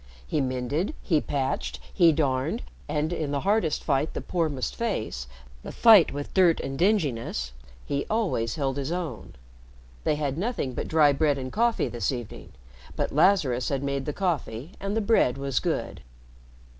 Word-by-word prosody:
He 145 - 0
mended, 135 - -2
he 160 -6 +2
patched, 135 -2 -2
he 170 -4 +6
darned, 145 - 0 0.3
and 155 +3 0
in 155 -4 -2
the 140 -1 -1
hardest 200 -6 +1
fight 140 +1 0
the - - -1
poor 170 -3 0
must 135 -3 -3
face 110 - -3 0.3
the - - -7
fight 220 -8 +7
with 145 +1 -6
dirt 180 -4 +4
and 135 0 -4
dinginess 135 - 0 0.3
he 140 0 -2
always 180 - 0
held 135 -2 -1
his 140 +2 -3
own. 175 -3 -5 0.7
They 150 - +2
had 145 0 -2
nothing 205 - -2
but - - -4
dry 150 -3 +4
bread 145 0 +2
and 130 -1 -6
coffee 235 +1 +2
this 115 -5 -1
evening, 120 -5 -7 0.4
but - - -2
Lazarus 145 -7 +3
had 140 -1 -1
made 140 -1 -2
the - - 0
coffee 150 - -2
and 200 +2 -2
the - - +2
bread 200 - +3
was 135 -2 -1
good. - - -3
145 Hz, 170 wpm, -26 LUFS, 135-180 Hz, 0.7 s, fight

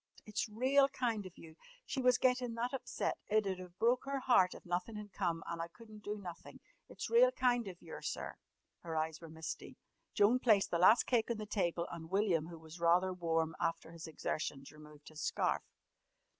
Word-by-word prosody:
"It's 210 +1 -2
real 265 +5 +4
kind 230 -7 -1
of 180 - -15
you. 160 -1 -13 0.3
She 270 - -2
was 250 -1 +5
gettin' 250 -2 +1
that 240 +3 -2
upset. 265 - -2
It 215 0 +2
'ud 190 -1 -2
have 180 0 -11
broke 240 +3 +2
her 275 0 -1
heart 240 -9 +4
if - - -12
nothin' 180 +5 -2
had 210 -1 -8
come 170 -4 -1
an' 170 0 -3
I 165 - -3
couldn't 215 +3 -14
do 210 0 -3
nothin'. 175 -4 -9 0.3
It's - - -6
real - - +7
kind 245 - +1
of 180 -2 -8
yer, 165 - -8
sir!" - - -4 0.5
Her 165 -2 -6
eyes 160 +1 -2
were 165 - -9
misty. 160 0 -7 0.4
Joan 225 +5 +5
placed 215 -6 +4
the 170 - +1
last 210 +7 +7
cake 235 -3 +2
on 235 - -1
the 215 - -5
table, 175 -5 -1
and 165 -1 -7
William, 190 -5 +2
who 170 -1 -9
was 160 +1 -12
rather 175 +2 +3
warm 165 -2 0
after 165 0 -2
his 165 -1 -8
exertions, 145 -3 -4
removed 150 -1 -14
his 155 -1 -9
scarf. - - +1
190 Hz, 200 wpm, -35 LUFS, 165-230 Hz, 0.5 s, real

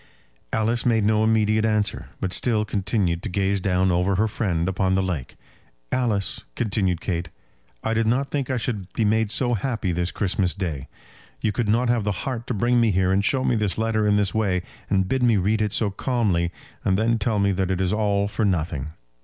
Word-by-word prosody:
Alice 115 +2 0
made 115 -4 +2
no 110 0 +3
immediate 110 -1 +2
answer, 105 -2 0
but 95 -1 -1
still 110 -4 +1
continued 95 -4 0
to 110 - -4
gaze 100 +1 0
down 95 -1 +2
over 90 +3 +1
her 110 +4 +2
friend 90 -6 -1
upon 95 0 +1
the 95 - +1
lake. 85 -9 -4 0.6
"Alice," 110 -6 0
continued 95 -5 0
Kate, 85 -3 -3 0.5
"I 110 - 0
did 115 0 +1
not 135 +5 +1
think 140 -3 -2
I 130 - 0
should 105 -6 -4
be 110 - 0
made 110 0 +2
so 120 +3 +2
happy 110 -4 -1
this 85 +1 -1
Christmas 95 -2 0
Day. 85 -9 -4 0.5
You 110 - 0
could 105 +1 -1
not 120 +4 +2
have 120 -3 +2
the 100 -3 -2
heart 120 -3 -4
to 125 - -2
bring 120 +3 +2
me 115 - +3
here 95 -1 +2
and 95 +1 +2
show 130 +5 +1
me 125 - +2
this 105 -3 -1
letter 110 -1 +1
in 105 - +3
this 100 -2 +1
way, 95 -5 0 0.3
and 95 -2 +2
bid 130 +5 0
me 120 -3 +4
read 105 +4 +1
it 105 -1 0
so 105 -1 0
calmly, 100 -7 0 0.3
and 95 -1 +2
then 115 +2 +1
tell 105 +1 0
me 100 0 +2
that 95 -1 -1
it 95 -1 0
is 95 0 +1
all 100 -2 +1
for 105 +2 -2
nothing. 80 -6 -1
105 Hz, 210 wpm, -23 LUFS, 95-110 Hz, 0.6 s, me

